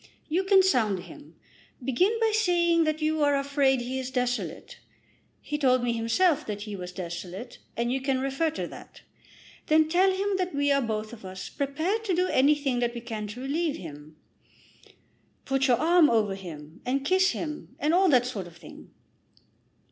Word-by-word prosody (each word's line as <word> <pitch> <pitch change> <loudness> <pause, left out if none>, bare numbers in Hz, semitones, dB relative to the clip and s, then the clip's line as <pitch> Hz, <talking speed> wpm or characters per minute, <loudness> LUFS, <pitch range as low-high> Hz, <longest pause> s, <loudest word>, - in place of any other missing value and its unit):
"You 345 +4 0
can 385 0 +5
sound 220 - +2
him. 295 +9 -13 0.5
Begin 365 - +2
by 450 -1 +2
saying 345 -5 +3
that 310 0 -1
you 310 0 +1
are 285 -1 +3
afraid 275 -2 +2
he 255 +2 -3
is 260 -1 -4
desolate. 250 - -3 0.6
He 295 0 -4
told 255 -3 +3
me 240 -1 +1
himself 285 +8 +2
that 205 -1 -4
he 210 -1 -6
was 180 -1 -7
desolate, 180 +5 -7 0.2
and 235 +1 0
you 265 - -1
can 265 -1 0
refer 275 +5 0
to 315 - -4
that. - - -13 0.6
Then 310 0 +4
tell 365 +4 +3
him 390 +1 -1
that 365 -4 -2
we 285 0 +2
are 275 0 +3
both 220 -2 -3
of 225 - -11
us 185 0 -7
prepared 315 +10 -2
to 380 -4 +1
do 365 +1 +2
anything 275 -2 +2
that 240 0 -1
we 235 - -5
can 220 -3 -5
to 220 +5 -8
relieve 295 +3 -1
him. 150 -2 -10 1.3
Put 270 0 +1
your 245 -2 +4
arm 335 0 +5
over 215 -4 +2
him, 160 -5 -10
and 270 +2 -1
kiss 370 +2 +4
him, 305 -2 -6
and 300 +3 0
all 375 +1 +4
that 250 -4 +4
sort 210 -8 -5
of 170 -1 -15
thing." 165 -3 -13
270 Hz, 185 wpm, -27 LUFS, 230-325 Hz, 1.3 s, can